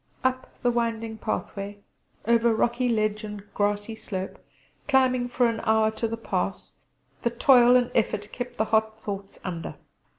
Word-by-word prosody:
Up 260 0 0
the 245 - +4
winding 230 -2 -2
pathway 200 0 -4 0.5
over 235 0 +4
rocky 240 +2 +1
ledge 215 -1 0
and 210 -1 -6
grassy 205 +2 0
slope, 190 -3 -6 0.4
climbing 255 -3 +3
for 245 0 +2
an 230 -1 0
hour 220 0 +3
to 230 +1 -2
the 230 +1 -4
pass, 195 -3 -3 0.5
the 235 - +1
toil 245 +1 +6
and 245 -1 +3
effort 210 -2 0
kept 245 0 -6
the 220 - +2
hot 220 0 +1
thoughts 200 -1 -6
under. 170 -3 -5
220 Hz, 155 wpm, -26 LUFS, 205-240 Hz, 0.5 s, toil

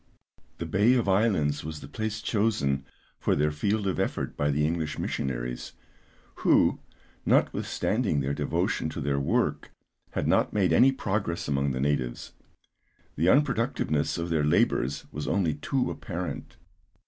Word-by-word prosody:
The - - -4
Bay 105 +6 +3
of 120 -5 +1
Islands 95 -8 +2
was 80 0 -6
the 70 - -10
place 110 +8 -4
chosen 85 - 0 0.3
for - - +1
their 75 +1 +2
field 100 +7 -1
of 95 - -1
effort - - -2
by 75 - 0
the 75 +1 +1
English 80 -1 -2
missionaries, - - -3 0.6
who, - - +3 0.4
notwithstanding 105 - +1
their 70 +1 -1
devotion - - -1
to - - -6
their 70 0 0
work 70 - 0 0.4
had - - -1
not - - +2
made 100 -3 +2
any 130 +2 +6
progress 100 -8 -2
among 70 -1 +1
the 65 -1 -2
natives. 65 -3 -1 0.8
The 85 +5 +2
unproductiveness 115 - +1
of 85 0 -3
their 80 -2 +2
labours 75 - +1
was 75 -1 -5
only 85 -5 +1
too 125 - -1
apparent. 90 -7 -6
80 Hz, 145 wpm, -27 LUFS, 70-105 Hz, 0.8 s, any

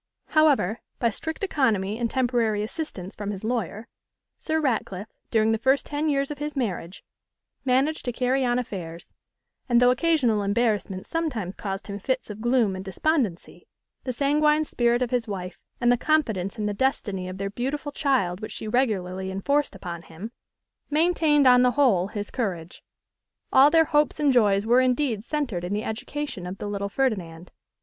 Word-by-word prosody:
However, 285 - +3 0.2
by 235 -2 +1
strict 320 - -5
economy 225 - +1
and 235 -1 0
temporary 235 -5 +1
assistance 215 - -6
from 205 -1 -5
his 200 -1 -5
lawyer, 220 -2 -3 0.5
Sir 315 0 -1
Ratcliffe, 220 -7 -2 0.2
during 220 0 +3
the 225 - 0
first 265 +4 +2
ten 300 +1 -1
years 275 0 0
of 295 - -6
his 295 0 -4
marriage, 195 -8 -3 0.6
managed 270 +5 +1
to 245 - 0
carry 255 +2 +1
on 245 -1 +1
affairs; 175 -8 -6 0.6
and 240 -1 +5
though 245 0 +6
occasional 255 -7 +2
embarrassments 205 -2 0
sometimes 250 - -2
caused 195 -1 -5
him 200 0 -6
fits 260 +1 -2
of 210 +1 -9
gloom 240 -5 +2
and 185 - -6
despondency, 205 - -2 0.4
the 255 - -2
sanguine 300 +4 +2
spirit 240 -4 +1
of 245 - -3
his 245 -2 0
wife, 185 -3 -6 0.2
and 240 -1 +3
the 245 - +3
confidence 235 - 0
in 210 - -2
the 210 - -1
destiny 200 -6 -1
of 185 - -7
their 195 0 -3
beautiful 280 +6 -3
child 255 - 0
which 215 - -6
she 220 - -6
regularly 190 -6 0
enforced 280 +10 0
upon 170 -2 -6
him, 170 +8 -9 0.6
maintained 305 -2 +3
on 250 -1 +7
the 250 0 +3
whole 225 -11 +3
his 205 0 -5
courage. 185 -8 -4 0.7
All 270 +2 +8
their 325 +1 +5
hopes 295 -1 +1
and 290 -3 +3
joys 205 -4 +3
were 240 +3 +5
indeed 250 -4 +1
centred 245 - -2
in 180 +3 -3
the 210 +1 -1
education 245 -3 -5
of 185 +2 -6
the - - -6
little 200 -1 -3
Ferdinand. 185 -9 -2
235 Hz, 170 wpm, -25 LUFS, 200-275 Hz, 0.7 s, All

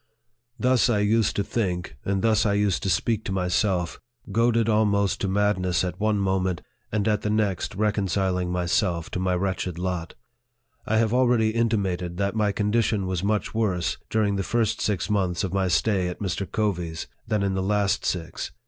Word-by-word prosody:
Thus 125 +2 +3
I 115 - +2
used 105 +1 +2
to 100 - +1
think, 95 -5 -2
and 100 0 -1
thus 110 -2 +3
I 105 - +2
used 100 -2 +1
to 100 - -1
speak 110 +5 +1
to - - -3
myself; 90 -1 0 0.3
goaded 115 +1 +2
almost 105 -3 +2
to 100 - 0
madness 95 -3 +1
at 90 -1 -4
one 110 0 +1
moment, 95 -3 0 0.3
and 105 -1 0
at 105 -1 +2
the 105 - -2
next 105 -5 0
reconciling 95 -3 0
myself 85 -1 0
to - - -2
my 90 0 +1
wretched 90 -2 -2
lot. 90 -2 -3 0.7
I 110 - +2
have 110 0 +2
already 120 -3 +3
intimated 95 -7 -1
that 100 0 0
my 105 -2 +2
condition 105 0 +1
was 95 -1 -2
much 105 +1 0
worse, 100 -6 0
during 105 -2 +1
the - - 0
first 115 +1 0
six 100 -5 0
months 95 -4 0
of 95 -2 -3
my 95 -1 +1
stay 95 +1 +1
at 90 - -4
Mr. 95 -1 -3
Covey's, 90 -6 -2 0.2
than 110 -3 0
in 100 -1 0
the 95 - -1
last 100 +1 +1
six. 85 -3 -3
100 Hz, 180 wpm, -25 LUFS, 90-110 Hz, 0.7 s, Thus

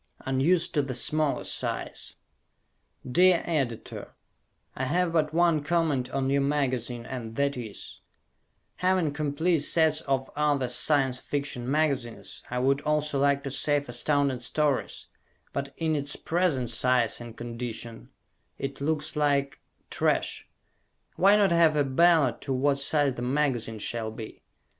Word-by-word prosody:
Unused 140 +7 +2
to 150 - +2
the 135 -2 -4
Smaller 150 +4 +1
Size - - -4 0.9
Dear 180 +7 +4
Editor: 135 -9 -3 0.6
I 130 - -2
have 175 +4 0
but 155 -2 +1
one 165 -2 +2
comment 150 -6 0
on 135 0 -1
your 140 0 +2
magazine 130 -4 -1
and 115 -3 -6
that 140 +1 0
is: 115 -5 -8 0.8
Having 180 -5 +1
complete 155 +3 0
sets 155 +1 +2
of 135 -1 0
other 145 -4 +1
Science 130 -1 +2
Fiction 140 -4 -4
magazines 140 -5 -1
I 125 - -3
would 135 +3 +2
also 150 -1 0
like 140 0 +2
to 135 - -4
save 145 +1 0
Astounding 140 +1 0
Stories, 145 +3 -1 0.5
but 140 0 -3
in 160 -1 0
its 145 0 +1
present 160 -9 0
size 125 -1 +1
and 120 -1 -10
condition 115 -1 -7 0.5
it 135 0 -5
looks 150 +1 0
like 145 -1 +1 0.3
trash. - - 0 0.7
Why 195 +3 +5
not 200 -3 +3
have 165 -2 +4
a 145 - +3
ballot 150 0 +3
to 135 - -2
what 140 +2 +1
size 145 -1 +2
the 120 - -7
magazine 125 -4 -1
shall 110 +1 -2
be? 110 0 -9
140 Hz, 140 wpm, -27 LUFS, 125-155 Hz, 0.9 s, Why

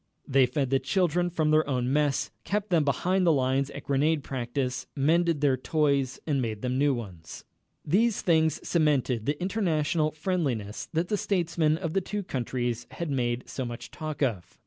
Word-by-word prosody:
They 135 -2 +4
fed 135 +1 -1
the 135 - +4
children 175 -1 +1
from 155 -3 +1
their 155 -1 +3
own 125 -1 0
mess, 145 -2 +1
kept 210 0 -2
them 165 -3 +4
behind 185 +6 +1
the 170 - +5
lines 135 -1 +1
at 140 - -8
grenade 145 +2 +1
practice, 125 0 -3
mended 160 +2 +2
their 140 -3 +4
toys 140 -2 0
and 140 -4 +1
made 110 -3 -4
them 125 0 -1
new 145 0 +4
ones. 95 -9 -8 0.4
These 215 +8 +2
things 160 -3 +3
cemented 140 -8 +1
the 145 +1 0
international 170 -5 +1
friendliness 145 - -2
that 165 +2 -1
the 210 - +1
statesmen 170 -5 +1
of 165 -2 -4
the 195 - +2
two 205 +2 -4
countries 120 -4 -3
had 170 -3 -4
made 120 -2 -1
so 130 - -4
much 120 -1 -7
talk 155 -2 -4
of. 110 -10 -2
145 Hz, 175 wpm, -27 LUFS, 130-170 Hz, 0.4 s, the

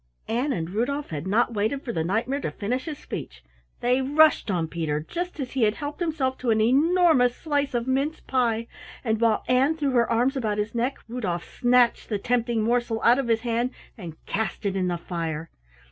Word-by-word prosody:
Ann 250 +6 0
and 165 -6 -3
Rudolf 280 +6 -2
had 150 +3 -4
not 235 +4 +2
waited 220 +7 -1
for 235 - -4
the 160 - 0
Knight 205 +8 0
mare 275 +2 -1
to - - -2
finish 245 +5 -3
his 310 -3 -5
speech. 60 +1 -7 0.4
They 250 +2 +2
rushed 295 0 +4
on 170 -4 0
Peter, 155 -3 -2
just 350 - -5
as 260 -3 -4
he 265 - -2
had 215 -1 +3
helped 290 0 -6
himself 305 -7 -1
to 250 - -2
an 220 -1 +3
enormous 280 +1 +4
slice 285 -4 -1
of 235 -1 0
mince 275 +4 0
pie, 230 -3 0 0.4
and 220 -2 0
while 225 -2 +3
Ann 270 +5 +3
threw 285 -3 0
her 240 -2 +2
arms 245 +4 +2
about 215 -6 -1
his 210 +1 -2
neck, 245 +3 -1
Rudolf 210 -8 -3
snatched 245 -1 +2
the 210 - 0
tempting 235 0 0
morsel 235 0 0
out 240 +3 +5
of 270 - -1
his 225 -1 +2
hand 240 +1 -1 0.2
and 170 -6 -9
cast 220 +1 -3
it 195 -1 0
in 185 -1 0
the 175 -1 -1
fire. 165 -2 -4
240 Hz, 205 wpm, -25 LUFS, 210-270 Hz, 0.4 s, out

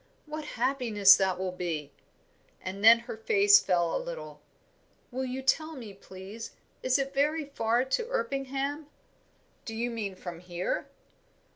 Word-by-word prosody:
What 305 0 -6
happiness 235 -6 +5
that 190 -2 +1
will 185 0 -2
be!" 165 -5 -4 0.7
And 195 +2 -6
then 230 +1 +8
her 235 - -7
face 405 - +5
fell 175 -2 +1
a - - -1
little. - - -8 0.7
"Will 260 +1 -2
you 260 +1 -4
tell 310 +4 +1
me, 225 -7 -9
please, 195 +3 -10 0.3
is 255 +1 +2
it 275 0 -2
very 300 +3 +1
far 240 -3 0
to 445 - -1
Erpingham?" 280 - -2 0.8
"Do 225 - -6
you 240 +2 -2
mean 210 -4 -4
from 175 -2 -8
here?" 180 0 -3
240 Hz, 145 wpm, -29 LUFS, 190-280 Hz, 0.8 s, then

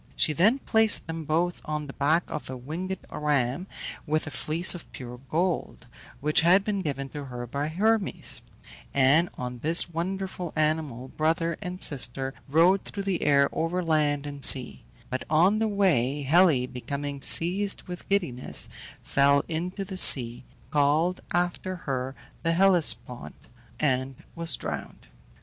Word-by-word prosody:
She 155 - +2
then 205 - +3
placed 220 -5 +3
them 165 -1 -6
both 170 +3 -1
on 150 -1 -4
the 135 - -9
back 155 +5 +1
of 150 - -7
a 130 - -6
winged 170 +9 -5
ram, 150 +2 -1 0.4
with 155 +1 0
a 155 - -7
fleece 160 +6 +2
of 175 - -11
pure 125 -2 -9
gold, 170 -5 -2 0.4
which 150 +2 +2
had 180 +4 +4
been 200 -1 -2
given 140 -5 -4
to 145 0 -8
her 125 -2 -7
by 140 +5 -4
Hermes; 205 +5 0 0.5
and 140 +6 +4
on 125 -1 -6
this 165 +5 +3
wonderful 185 0 -4
animal 150 -5 -2
brother 165 +3 -1
and 180 +1 -4
sister 135 -1 +2 0.2
rode 175 +6 +4
through 200 - -6
the 195 -3 -2
air 140 -1 +3
over 175 +3 -2
land 150 -3 0
and 145 -1 -8
sea; 130 - +4 0.3
but 130 - -3
on 180 +7 +3
the 220 - +1
way 150 - +1
Helle, 155 -3 +3
becoming 140 +3 -6
seized 190 +8 +3
with 180 -1 -9
giddiness, 170 -11 -1 0.3
fell 140 0 +2
into 180 +4 -4
the 190 -1 -7
sea 125 -7 +6 0.3
(called 150 +5 +1
after 175 +1 -2
her 135 -5 -4 0.3
the 165 0 0
Hellespont) 175 -9 +1 0.4
and 130 -2 -1 0.2
was 170 -1 0
drowned. - - -7
155 Hz, 150 wpm, -26 LUFS, 140-180 Hz, 0.5 s, sea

